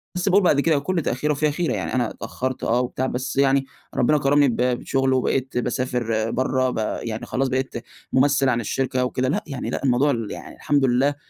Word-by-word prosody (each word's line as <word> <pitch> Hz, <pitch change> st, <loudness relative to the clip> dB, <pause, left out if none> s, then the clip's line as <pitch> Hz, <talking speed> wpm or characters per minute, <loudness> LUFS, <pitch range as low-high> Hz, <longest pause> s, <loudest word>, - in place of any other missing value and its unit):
بس 180 Hz, +2 st, 0 dB
باقول 195 Hz, +1 st, +4 dB
بعد 150 Hz, -5 st, +4 dB
كده 155 Hz, 0 st, +3 dB
كل 170 Hz, +4 st, -1 dB
تأخير 150 Hz, +1 st, -1 dB
وفيها 150 Hz, +1 st, +1 dB
خيرة، 165 Hz, +3 st, -1 dB
يعني -, -, -3 dB
أنا 120 Hz, -3 st, +1 dB
اتأخرت 130 Hz, 0 st, -5 dB
آه 120 Hz, +2 st, +2 dB
وبتاع 125 Hz, +1 st, -2 dB
بس 130 Hz, +1 st, -3 dB
يعني 135 Hz, 0 st, +3 dB, 0.3 s
ربنا 150 Hz, +5 st, +3 dB
كرمني 145 Hz, 0 st, +3 dB
ب 120 Hz, -, 0 dB
بشغل 125 Hz, +2 st, +1 dB
وبقيت 130 Hz, 0 st, 0 dB
باسافر 120 Hz, -3 st, -1 dB
برّه، 130 Hz, 0 st, +1 dB
ب -, -, -4 dB, 0.3 s
يعني 110 Hz, -1 st, -4 dB
خلاص 135 Hz, +1 st, -1 dB
بقيت 130 Hz, +1 st, -2 dB, 0.4 s
ممثّل 135 Hz, 0 st, +3 dB
عن 120 Hz, -2 st, +1 dB
الشركة 130 Hz, +2 st, -1 dB
وكده، 130 Hz, 0 st, -1 dB
لأ -, -, -1 dB
يعني 135 Hz, -4 st, -4 dB
لأ -, -, -3 dB
الموضوع 135 Hz, +2 st, +3 dB
ال 115 Hz, -5 st, -3 dB
يعني -, -, -8 dB
الحمد 140 Hz, -2 st, +1 dB
لله. 130 Hz, +3 st, +2 dB
130 Hz, 200 wpm, -23 LUFS, 125-140 Hz, 0.4 s, باقول